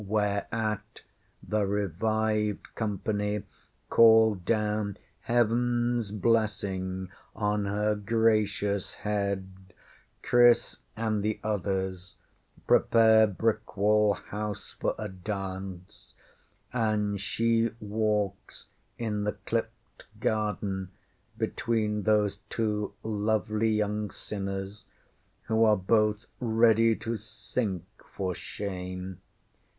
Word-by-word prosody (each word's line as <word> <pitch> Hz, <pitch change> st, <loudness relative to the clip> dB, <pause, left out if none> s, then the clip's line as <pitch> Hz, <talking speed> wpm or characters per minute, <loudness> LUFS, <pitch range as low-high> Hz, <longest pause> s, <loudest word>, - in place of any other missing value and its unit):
Whereat 105 Hz, +1 st, -2 dB, 0.4 s
the 105 Hz, -1 st, +1 dB
revived 105 Hz, +2 st, 0 dB
company 105 Hz, -1 st, -2 dB, 0.5 s
call 110 Hz, -1 st, +7 dB
down 105 Hz, +1 st, -1 dB, 0.3 s
HeavenŌĆÖs 120 Hz, -2 st, +1 dB
blessing 95 Hz, -4 st, 0 dB, 0.3 s
on 105 Hz, -1 st, 0 dB
her 105 Hz, +2 st, +1 dB
gracious 105 Hz, -2 st, +1 dB
head; 100 Hz, -2 st, -1 dB, 0.8 s
Chris 120 Hz, -1 st, +4 dB, 0.2 s
and 110 Hz, -2 st, 0 dB
the 105 Hz, +1 st, -1 dB
others 95 Hz, -2 st, -2 dB, 0.5 s
prepare 110 Hz, -1 st, +5 dB
Brickwall 105 Hz, 0 st, +2 dB
House 105 Hz, +3 st, -6 dB
for -, -, -1 dB
a 110 Hz, -, -4 dB
dance; 95 Hz, -1 st, -6 dB, 0.6 s
and 105 Hz, -4 st, 0 dB
she 115 Hz, +2 st, +1 dB
walks 105 Hz, -2 st, -2 dB, 0.3 s
in 105 Hz, -3 st, -2 dB
the 105 Hz, -, 0 dB
clipped -, -, -4 dB
garden 100 Hz, -3 st, -1 dB, 0.5 s
between 110 Hz, -2 st, 0 dB
those 105 Hz, -1 st, +2 dB
two 105 Hz, -2 st, -1 dB
lovely 110 Hz, 0 st, 0 dB
young 105 Hz, -1 st, 0 dB
sinners 100 Hz, 0 st, -5 dB, 0.6 s
who 110 Hz, 0 st, +2 dB
are 110 Hz, -1 st, +5 dB
both 105 Hz, +2 st, +2 dB
ready 115 Hz, -1 st, +4 dB
to 115 Hz, +1 st, -3 dB
sink 105 Hz, -2 st, -3 dB, 0.3 s
for 95 Hz, -2 st, -1 dB
shame. 90 Hz, -1 st, -6 dB
105 Hz, 85 wpm, -28 LUFS, 100-110 Hz, 0.8 s, call